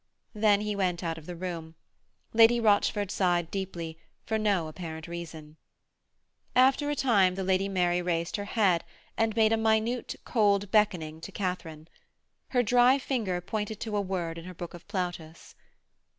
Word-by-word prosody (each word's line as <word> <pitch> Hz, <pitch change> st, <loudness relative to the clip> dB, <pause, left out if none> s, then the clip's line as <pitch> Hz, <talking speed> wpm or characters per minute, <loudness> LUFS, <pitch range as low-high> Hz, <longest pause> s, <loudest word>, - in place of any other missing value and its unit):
Then 210 Hz, -2 st, +3 dB
he 210 Hz, 0 st, -2 dB
went 180 Hz, -3 st, -1 dB
out 165 Hz, -1 st, -3 dB
of 155 Hz, -, -16 dB
the 180 Hz, -, -6 dB
room. 165 Hz, -2 st, -6 dB, 0.6 s
Lady 230 Hz, +1 st, +6 dB
Rochford 205 Hz, -2 st, +2 dB
sighed 175 Hz, -3 st, +1 dB
deeply, 170 Hz, -4 st, -5 dB, 0.3 s
for 220 Hz, -1 st, -1 dB
no 200 Hz, -6 st, +1 dB
apparent 160 Hz, 0 st, -7 dB
reason. 160 Hz, -3 st, -8 dB, 1.0 s
After 265 Hz, +3 st, +4 dB
a 295 Hz, -, 0 dB
time 200 Hz, -10 st, +3 dB
the 190 Hz, -, -3 dB
Lady 190 Hz, +1 st, +1 dB
Mary 180 Hz, -2 st, +1 dB
raised 170 Hz, -1 st, -1 dB
her 205 Hz, -, -4 dB
head 195 Hz, -5 st, +2 dB, 0.3 s
and 225 Hz, -1 st, 0 dB
made 220 Hz, -1 st, +4 dB
a -, -, +3 dB
minute, 220 Hz, +2 st, 0 dB
cold 205 Hz, -3 st, +2 dB
beckoning 175 Hz, -8 st, +1 dB
to 195 Hz, -, -8 dB
Katharine. 180 Hz, -5 st, -4 dB, 0.6 s
Her 245 Hz, -1 st, +2 dB
dry 245 Hz, +3 st, +5 dB
finger 225 Hz, -10 st, -2 dB
pointed 210 Hz, +3 st, -4 dB
to 220 Hz, -2 st, -3 dB
a 205 Hz, -, +2 dB
word 175 Hz, -4 st, -3 dB
in 165 Hz, -, -11 dB
her 185 Hz, 0 st, -9 dB
book 175 Hz, +1 st, -7 dB
of 175 Hz, -, -12 dB
Plautus. 175 Hz, -5 st, -5 dB
190 Hz, 165 wpm, -28 LUFS, 170-215 Hz, 1.0 s, Lady